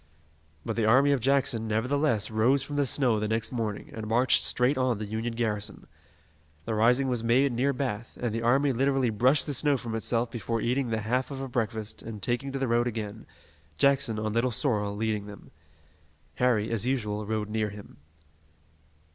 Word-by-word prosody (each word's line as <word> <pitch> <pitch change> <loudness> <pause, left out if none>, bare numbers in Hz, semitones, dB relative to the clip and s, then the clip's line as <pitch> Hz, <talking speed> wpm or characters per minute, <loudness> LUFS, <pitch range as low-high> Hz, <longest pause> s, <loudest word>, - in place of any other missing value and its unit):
But 115 - -2
the 115 - +2
army 135 +5 +5
of 140 - +2
Jackson, 125 -3 +1
nevertheless, 115 0 0
rose 125 +5 +2
from 145 +2 -6
the 145 -1 +1
snow 125 -5 +2
the 105 - -1
next 110 +1 -1
morning, 110 -5 -4
and 110 -1 -6
marched 120 +4 +3
straight 125 +4 +3
on 130 -3 +1
the 105 - -4
Union 110 +3 -3
garrison. 105 -3 -3 0.8
The 115 - -2
rising 125 +5 +3
was 120 -3 -1
made 130 +4 +3
near 125 +4 +1
Bath, 125 -4 -4
and 120 -3 -2
the 115 - -2
army 135 +4 +3
literally 135 -1 +1
brushed 130 +6 +3
the 145 - -2
snow 145 +1 +2
from 115 -2 -6
itself 115 +1 0
before 115 0 -3
eating 125 +2 0
the 110 -1 -1
half 125 +4 -1
of 135 -2 -6
a 135 - -4
breakfast, 110 -3 -3
and 110 -2 -7
taking 125 +6 -2
to 135 - -3
the 135 -1 -1
road 120 +1 +2
again, 110 -2 -5 0.5
Jackson, 135 -5 +2
on 110 0 -2
Little 115 +3 +1
Sorrel, 105 -5 0
leading 105 -1 -2
them. 100 -1 -12 0.9
Harry, 115 -4 +1
as 115 -2 0
usual, 105 -5 -2
rode 105 -1 -2
near 110 -1 0
him. 105 0 -12
115 Hz, 190 wpm, -27 LUFS, 110-130 Hz, 0.9 s, army